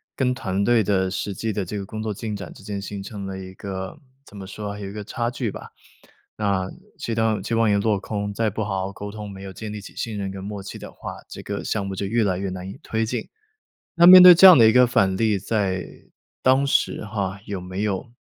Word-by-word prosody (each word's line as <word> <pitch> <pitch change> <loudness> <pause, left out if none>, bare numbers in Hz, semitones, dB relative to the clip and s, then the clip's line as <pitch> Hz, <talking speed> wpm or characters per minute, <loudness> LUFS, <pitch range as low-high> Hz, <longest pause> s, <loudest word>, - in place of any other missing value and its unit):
跟 125 -2 +1
团 100 -6 -2
队 115 +1 +3
的 95 -2 +1
实 100 +1 -3
际 110 +4 -3
的 100 -2 -2
这 105 +4 -5
个 - - -5
工 110 +3 -6
作 110 - -2
进 105 +1 -5
展 100 - -8
之 - - -15
间 100 -1 -4
形 100 0 -6
成 100 0 -7
了 95 0 -6
一 95 0 -9
个， 95 +1 -6 0.3
怎 105 -7 -14
么 95 - -7
说 105 +2 -6
啊， 105 - -9
有 100 - -6
一 - - -7
个 105 -1 -6
差 120 +3 -3
距 120 -3 -3
吧。 - - -9 0.6
那 100 -3 -1 0.3
期 115 - -3
洞 110 -2 +1
期 115 - -4
望 115 -1 +3
也 100 - +3
落 105 0 +1
空， 105 +1 -4
再 110 +1 0
不 110 - -5
好 95 -3 -2
好 95 - -4
沟 100 +1 -7
通 105 -1 -8
没 95 - -10
有 95 -1 -8
建 110 +1 -7
立 105 - -6
起 100 - -12
信 110 -3 -4
任 100 -1 -3
跟 95 0 -7
默 100 0 -6
契 95 - -8
的 - - -10
话， - - -8 0.2
这 - - -8
个 - - -4
项 100 -3 -2
目 95 - -4
就 100 - -3
越 110 +2 +1
来 95 -2 0
越 95 0 -3
难 90 0 -6
以 - - -9
推 110 0 -1
进。 120 +3 -4 0.7
那 170 0 +6
面 185 +1 +11
对 180 -1 +11
这 185 - +7
样 185 -4 +11
的 115 -3 +7
一 110 - +4
个 125 0 +7
反 95 -6 +2
例， 110 -1 +1
在 100 -2 -1 0.6
当 130 +2 +3
时 135 - 0
哈， 100 -2 -3
有 100 -3 -5
没 95 +2 -5
有 105 +2 -2
105 Hz, 280 characters per minute, -23 LUFS, 95-110 Hz, 0.7 s, 面